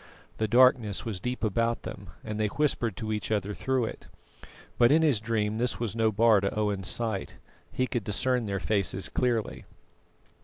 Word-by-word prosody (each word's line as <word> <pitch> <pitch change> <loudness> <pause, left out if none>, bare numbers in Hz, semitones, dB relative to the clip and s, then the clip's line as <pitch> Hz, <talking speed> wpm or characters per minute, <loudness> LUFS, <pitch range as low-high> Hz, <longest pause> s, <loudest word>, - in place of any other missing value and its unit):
The 110 - +1
darkness 120 -3 +4
was 105 -5 -4
deep 125 +5 -4
about 115 +2 0
them, - - -8
and 105 0 -5
they 105 - +2
whispered 120 -5 0
to 110 -1 -3
each 105 - -3
other 105 -1 -1
through 130 +1 0
it; - - -8 0.7
but 120 +1 +6
in 160 +2 +5
his 145 -9 +3
dream 110 -1 -1
this 125 0 -1
was 115 -2 -3
no 110 -1 +2
bar 110 -1 +4
to 100 - 0
Owen's 100 -3 -1
sight. 110 -5 -3 0.4
He 130 - 0
could 120 -3 -3
discern 125 +4 0
their 100 -1 -2
faces 100 -2 -1
clearly. 120 -4 -1
110 Hz, 180 wpm, -28 LUFS, 105-120 Hz, 0.7 s, but